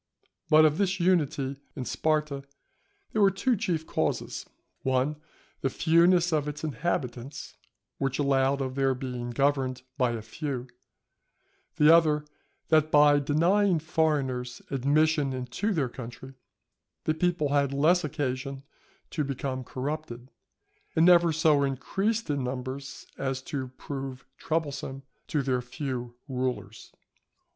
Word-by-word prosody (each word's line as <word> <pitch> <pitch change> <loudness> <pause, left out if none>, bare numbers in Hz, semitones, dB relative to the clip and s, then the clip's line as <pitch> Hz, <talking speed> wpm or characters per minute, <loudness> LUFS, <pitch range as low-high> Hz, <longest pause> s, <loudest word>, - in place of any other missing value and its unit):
But 155 0 +7
of 155 +2 +2
this 190 -1 +1
unity 150 -6 +1 0.2
in 130 - -4
Sparta 150 -2 0 0.7
there 215 - +1
were 200 - +7
two 215 +6 +1
chief 180 -7 -1
causes: - - -2 0.3
one, 130 +3 +1 0.4
the 135 - +1
fewness 170 +3 +4
of 150 -2 +1
its 150 +1 -5
inhabitants, 135 -3 -3 0.4
which 135 -1 0
allowed 140 -1 +2
of 130 -1 -2
their 135 -1 +1
being 125 -2 -5
governed 130 0 0 0.2
by 125 -2 +2
a 115 -2 -5
few; 130 +2 -4 1.1
the 150 +2 +7
other, 150 -3 +3 0.4
that 155 -1 +4
by 145 -1 +6
denying 170 +7 +3
foreigners 145 -6 -1
admission 145 +1 +2
into 130 - -2
their 155 -9 +1
country, 125 +2 -9 0.7
the 155 - +1
people 170 -2 0
had 140 -1 +2
less 160 +6 +3
occasion 135 -2 -3 0.5
to 155 - -1
become 135 -1 -3
corrupted, 130 -2 -5 0.6
and 160 - +5
never 175 -1 +6
so 155 -2 +3
increased 195 - -1
in 145 -3 -1
numbers 130 +2 -5
as 130 -1 -1
to 135 -2 -4
prove 135 -2 -6
troublesome 140 -4 -3 0.2
to 150 -3 0
their 130 -2 0
few 125 -1 -5
rulers. 130 -2 -4
140 Hz, 125 wpm, -28 LUFS, 130-160 Hz, 1.1 s, But